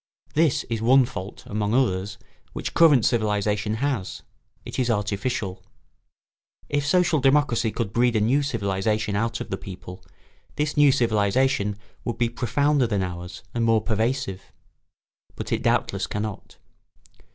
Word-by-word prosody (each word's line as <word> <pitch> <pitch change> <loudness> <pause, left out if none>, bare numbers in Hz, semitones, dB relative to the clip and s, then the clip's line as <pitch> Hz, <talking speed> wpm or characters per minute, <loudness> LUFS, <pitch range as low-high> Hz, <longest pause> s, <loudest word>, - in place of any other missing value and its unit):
This 155 -3 +2
is 115 -3 -4
one 130 +3 +5
fault, 100 -6 -8
among 105 +1 -1
others, 100 -6 0 0.4
which - - -4
current 150 -9 +5
civilisation 105 -1 0
has; 125 -6 -2 0.4
it - - -5
is 125 -1 +1
artificial. 105 -2 -2 1.1
If 145 0 0
social 175 -1 +3
democracy 135 -4 +3
could 105 -2 -3
breed 120 0 +2
a - - +3
new 125 +7 +2
civilisation 105 -4 -1
out 115 +3 -1
of - - -7
the 95 - -1
people, 90 -1 -9 0.5
this 150 0 -1
new 145 -1 +6
civilisation 110 -2 +1 0.3
would 120 - -3
be 120 -1 +1
profounder 135 +3 +1
than 100 -4 0
ours 90 0 -7
and 120 - 0
more 115 -1 +4
pervasive. 115 -2 -2 0.8
But - - -6
it - - 0
doubtless - - 0
cannot. 105 -1 -5
115 Hz, 140 wpm, -24 LUFS, 105-130 Hz, 1.1 s, new